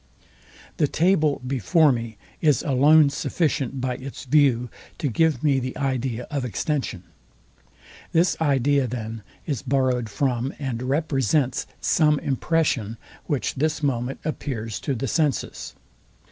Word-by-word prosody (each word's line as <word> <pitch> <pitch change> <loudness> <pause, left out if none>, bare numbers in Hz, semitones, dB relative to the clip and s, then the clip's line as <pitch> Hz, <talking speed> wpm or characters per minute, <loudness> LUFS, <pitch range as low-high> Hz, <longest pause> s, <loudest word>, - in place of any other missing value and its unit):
The 150 - +3
table 155 -4 +2
before 135 - +3
me 115 -3 -4 0.2
is 150 -6 +3
alone 145 +2 +5
sufficient 145 -3 -1
by 125 -1 -2
its 135 +1 -8
view 130 -4 +3 0.3
to 155 - -1
give 155 +1 +1
me 140 -3 +3
the 130 0 -5
idea 130 -3 -2
of 140 -3 -1
extension. 125 - -2 1.1
This 170 +3 +3
idea, 140 -2 +2
then, 115 -2 -5 0.2
is 140 -7 -2
borrowed 130 -4 0
from, 125 +3 -1
and 130 -5 -3
represents 135 -1 0
some 150 -2 +3
impression, 135 -6 0 0.3
which 145 -5 -1
this 150 +2 -1
moment 125 -1 -1
appears 115 -8 -4
to 140 - -2
the 135 +3 -3
senses. 150 +1 -1
135 Hz, 125 wpm, -24 LUFS, 125-150 Hz, 1.1 s, alone